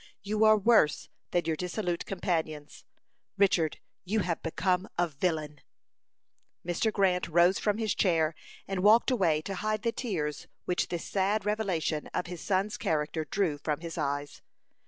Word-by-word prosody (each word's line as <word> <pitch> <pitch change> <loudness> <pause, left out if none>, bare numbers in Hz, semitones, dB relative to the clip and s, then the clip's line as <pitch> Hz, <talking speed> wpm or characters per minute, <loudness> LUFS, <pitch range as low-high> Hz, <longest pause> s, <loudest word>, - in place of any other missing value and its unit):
You 215 +2 +2
are 215 0 +7
worse 205 -8 +3 0.2
than 175 -2 0
your 160 -1 0
dissolute 180 +1 -3
companions. 160 -6 -3 0.5
Richard, 180 -6 +2 0.3
you 210 +3 0
have 175 -2 -2
become 180 +4 0
a 175 0 +2
villain!" 150 -1 -2 1.0
Mr. 175 +6 0
Grant 185 -3 +1
rose 175 +3 +4
from 210 -1 0
his 220 -2 0
chair 165 -4 +2 0.3
and 195 -1 -2
walked 220 +6 +5
away 165 -10 +2
to 195 - -4
hide 215 +3 -2
the 230 - +1
tears 165 - -3 0.2
which 180 - 0
this 175 -2 -4
sad 200 +1 0
revelation 190 -8 -1
of - - -1
his 180 -1 -7
son's 195 +1 0
character 155 -3 -1
drew 160 -3 -1
from 150 +1 -2
his 165 -1 -6
eyes. 145 -2 -3
180 Hz, 155 wpm, -29 LUFS, 160-205 Hz, 1.0 s, are